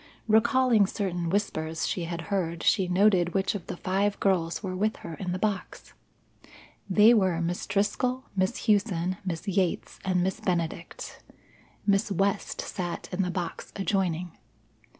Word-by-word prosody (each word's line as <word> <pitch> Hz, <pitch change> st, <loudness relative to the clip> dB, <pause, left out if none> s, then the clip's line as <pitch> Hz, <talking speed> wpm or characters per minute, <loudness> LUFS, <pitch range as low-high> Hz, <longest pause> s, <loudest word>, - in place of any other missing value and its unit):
Recalling 230 Hz, -1 st, +4 dB
certain 180 Hz, -5 st, -2 dB
whispers 165 Hz, -5 st, -1 dB
she 175 Hz, -, -2 dB
had 170 Hz, 0 st, -4 dB
heard, 170 Hz, -3 st, -1 dB
she 190 Hz, -4 st, +3 dB
noted 180 Hz, -1 st, +3 dB
which 195 Hz, 0 st, +1 dB
of 200 Hz, -5 st, -6 dB
the -, -, -5 dB
five 200 Hz, +3 st, 0 dB
girls 180 Hz, -2 st, +1 dB
were 185 Hz, -2 st, -3 dB
with 215 Hz, +4 st, 0 dB
her 165 Hz, -, -5 dB
in 180 Hz, +2 st, -4 dB
the 180 Hz, -, -1 dB
box. 200 Hz, -1 st, -3 dB, 1.0 s
They 210 Hz, +5 st, +7 dB
were 190 Hz, -7 st, +2 dB
Miss 170 Hz, +1 st, -2 dB
Driscoll, 250 Hz, +6 st, 0 dB
Miss 190 Hz, +4 st, 0 dB
Hughson, 190 Hz, -5 st, +1 dB
Miss 180 Hz, +1 st, -4 dB
Yates, 190 Hz, -2 st, -1 dB
and 185 Hz, -2 st, +1 dB
Miss 190 Hz, 0 st, -1 dB
Benedict. 170 Hz, -1 st, -3 dB, 0.6 s
Miss 200 Hz, +1 st, +2 dB
West 200 Hz, +2 st, 0 dB
sat 175 Hz, -3 st, -5 dB
in 180 Hz, +1 st, 0 dB
the 180 Hz, -, 0 dB
box 175 Hz, -2 st, -4 dB
adjoining. 185 Hz, -4 st, -1 dB
190 Hz, 150 wpm, -27 LUFS, 175-205 Hz, 1.0 s, They